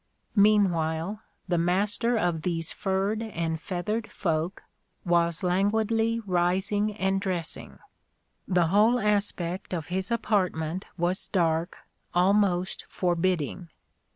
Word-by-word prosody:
Meanwhile 195 Hz, -2 st, +2 dB, 0.3 s
the 175 Hz, -2 st, +1 dB
master 205 Hz, +7 st, +1 dB
of 175 Hz, -6 st, 0 dB
these 165 Hz, -1 st, -2 dB
furred 195 Hz, +3 st, -1 dB
and 165 Hz, -7 st, -3 dB
feathered 210 Hz, +6 st, -3 dB
folk 165 Hz, +1 st, -2 dB, 0.4 s
was 170 Hz, -1 st, +2 dB
languidly 220 Hz, +5 st, +1 dB
rising 195 Hz, +2 st, 0 dB
and 195 Hz, -1 st, 0 dB
dressing. 180 Hz, -5 st, -3 dB, 0.7 s
The 175 Hz, -3 st, +2 dB
whole 215 Hz, +6 st, +4 dB
aspect 200 Hz, -4 st, -1 dB
of 165 Hz, -2 st, -5 dB
his 185 Hz, +3 st, -2 dB
apartment 185 Hz, -7 st, 0 dB
was 175 Hz, +2 st, -1 dB
dark, 165 Hz, -1 st, 0 dB, 0.4 s
almost 185 Hz, 0 st, +2 dB
forbidding. 175 Hz, -1 st, -1 dB
185 Hz, 100 wpm, -27 LUFS, 170-205 Hz, 0.7 s, whole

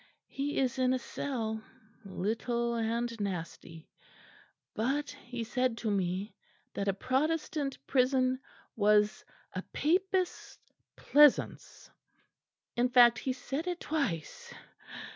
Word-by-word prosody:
He 280 Hz, +2 st, -3 dB
is 260 Hz, -1 st, 0 dB
in 255 Hz, 0 st, +3 dB
a -, -, +2 dB
cell, 230 Hz, -3 st, -4 dB, 0.4 s
little 230 Hz, +5 st, -1 dB
and 230 Hz, 0 st, -1 dB
nasty; 165 Hz, -4 st, -5 dB, 0.9 s
but 275 Hz, +7 st, -1 dB
he 240 Hz, -1 st, -7 dB
said 245 Hz, +1 st, 0 dB
to 225 Hz, -2 st, -2 dB
me 190 Hz, +1 st, -1 dB, 0.4 s
that 200 Hz, -, -3 dB
a 195 Hz, -, +3 dB
Protestant 290 Hz, +4 st, -1 dB
prison 255 Hz, -1 st, +2 dB, 0.4 s
was 210 Hz, 0 st, +3 dB, 0.3 s
a 185 Hz, -, -3 dB
Papist's 370 Hz, -, -1 dB, 0.4 s
pleasaunce 295 Hz, -1 st, +3 dB, 0.8 s
in 245 Hz, +1 st, +2 dB
fact 240 Hz, -2 st, +6 dB
he 260 Hz, -, -1 dB
said 275 Hz, +6 st, -4 dB
it 355 Hz, -1 st, -2 dB
twice. 245 Hz, -, -3 dB
245 Hz, 105 wpm, -31 LUFS, 215-275 Hz, 0.9 s, fact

